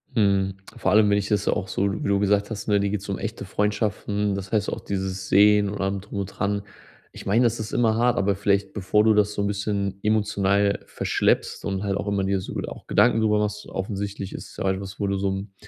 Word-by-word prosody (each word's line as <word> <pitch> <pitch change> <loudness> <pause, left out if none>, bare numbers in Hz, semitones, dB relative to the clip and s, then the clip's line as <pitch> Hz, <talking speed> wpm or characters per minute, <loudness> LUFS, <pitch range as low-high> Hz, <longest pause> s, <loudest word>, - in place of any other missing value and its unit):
Mhm. 100 -3 +2 0.2
Vor - - 0
allem 105 0 +5
wenn 100 - +3
ich 100 0 -2
das 105 -1 +1
ja - - +3
auch 100 -2 -3
so 100 +1 0
wie - - -1
du 100 0 +2
gesagt 100 0 +2
hast, 105 -3 -6
ne, 105 -1 +3
dir 100 0 0
geht's 100 -1 -3
um 100 - -1
echte 110 -2 -5
Freundschaften. 105 0 -1
Das 95 -1 -6
heißt 105 -2 +1
auch - - -5
dieses 95 -1 -4
Sehen 105 +1 +5
und 100 0 -5
allem 95 0 -1
drum 100 0 -6
und 100 - -1
dran. 100 +1 -2 0.5
Ich - - -10
meine, 110 +5 +3
das 120 -1 +1
ist 110 -1 -5
immer 115 -2 +3
hart, 120 +1 +2
aber 100 0 +2
vielleicht, 100 0 0
bevor 105 +1 +2
du 110 0 +5
das 105 0 +2
so 105 - -2
'n 100 - 0
bisschen 100 -1 -2
emotional 100 -2 +2
verschleppst - - 0
und 95 0 -2
halt 100 -1 0
auch - - -4
immer 100 -1 0
dir 95 0 +1
so - - -7
wohl - - -3
auch - - -11
Gedanken 115 - +4
drüber 105 -1 +3
machst, 105 0 -2
offensichtlich 100 0 -4
ist - - -9
ja 95 - 0
etwas, 95 +1 -4
wo 100 - 0
du 100 0 0
so 100 0 0
'n 95 +1 -5
100 Hz, 245 wpm, -24 LUFS, 100-105 Hz, 0.5 s, allem